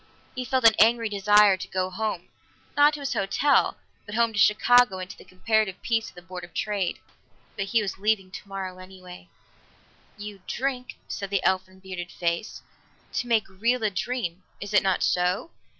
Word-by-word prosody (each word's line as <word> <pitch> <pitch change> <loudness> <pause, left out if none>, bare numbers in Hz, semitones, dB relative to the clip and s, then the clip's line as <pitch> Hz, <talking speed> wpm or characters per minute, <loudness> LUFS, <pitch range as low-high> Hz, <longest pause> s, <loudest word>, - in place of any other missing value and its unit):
He 255 -1 -4
felt 260 -1 0
an 225 - +7
angry 230 +1 +4
desire 205 -1 +5
to 190 +1 -7
go 185 0 -2
home 190 -2 -3 0.5
not 290 +1 +5
to 295 - -8
his 275 - -2
hotel, 200 +9 +2 0.3
but 205 - -6
home 230 -1 +2
to 205 - -2
Chicago 245 0 +5
and 185 -1 -5
to - - -10
the - - -15
comparative 195 +1 0
peace 225 -1 0
of - - -21
the 175 - -12
Board 180 0 -8
of 175 - -12
Trade. 200 -4 -1 0.6
But 195 - -2
he 215 +2 +1
was 190 -1 -5
leaving 200 -2 0
tomorrow 190 -2 -7
anyway. 185 -1 -12 0.9
"You 205 -2 -8
drink," 255 -1 -3
said 200 -1 -5
the 195 -2 0
elfin, 185 0 -1
bearded 185 -2 -7
face, 170 +4 -3 0.5
"to 245 - -2
make 225 -2 +2
real 230 +6 0
a 215 - +1
dream. 190 -3 -3 0.2
Is 205 +1 -7
it 205 - +6
not 190 -2 +1
so? 180 - 0
200 Hz, 180 wpm, -26 LUFS, 185-225 Hz, 0.9 s, an